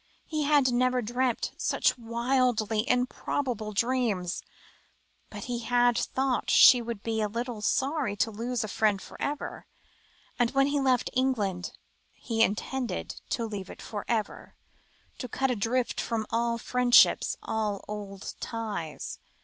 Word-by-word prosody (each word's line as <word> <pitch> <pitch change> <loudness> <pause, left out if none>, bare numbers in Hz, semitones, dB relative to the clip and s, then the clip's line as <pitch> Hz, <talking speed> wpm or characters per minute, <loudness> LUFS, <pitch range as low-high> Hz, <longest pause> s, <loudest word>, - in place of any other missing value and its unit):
He 310 -2 -2
had 280 -4 +4
never 250 0 +2
dreamt 245 +2 -1
such - - +1
wildly 235 -1 0
improbable 250 -2 -1
dreams, 215 -5 0 0.9
but - - -7
he 245 -1 -3
had 245 0 +3
thought 265 +1 0
she 250 -2 +8
would 230 -3 -6
be 225 -1 -1
a 210 - +1
little 235 0 -4
sorry 270 0 0
to 225 +2 0
lose 235 +3 -2
a - - -3
friend 210 -1 +1
for - - -12
ever; 290 +1 -4 0.7
and 240 -1 +3
when 275 0 +5
he 285 +1 +1
left 260 -3 +2
England, 215 -9 0 0.4
he 225 -2 -2
intended 230 0 -1
to 230 - -1
leave 205 -4 -6
it - - -10
for 205 -2 -6
ever, 220 -3 -3 0.6
to 250 - -4
cut 265 +2 0
adrift 240 +2 0
from 225 -2 -2
all 235 0 +1
old 235 - -6
friendships, 250 -1 +4
all 210 -3 -2
old 200 -2 -6
ties. 210 -9 -5
235 Hz, 140 wpm, -28 LUFS, 215-255 Hz, 0.9 s, she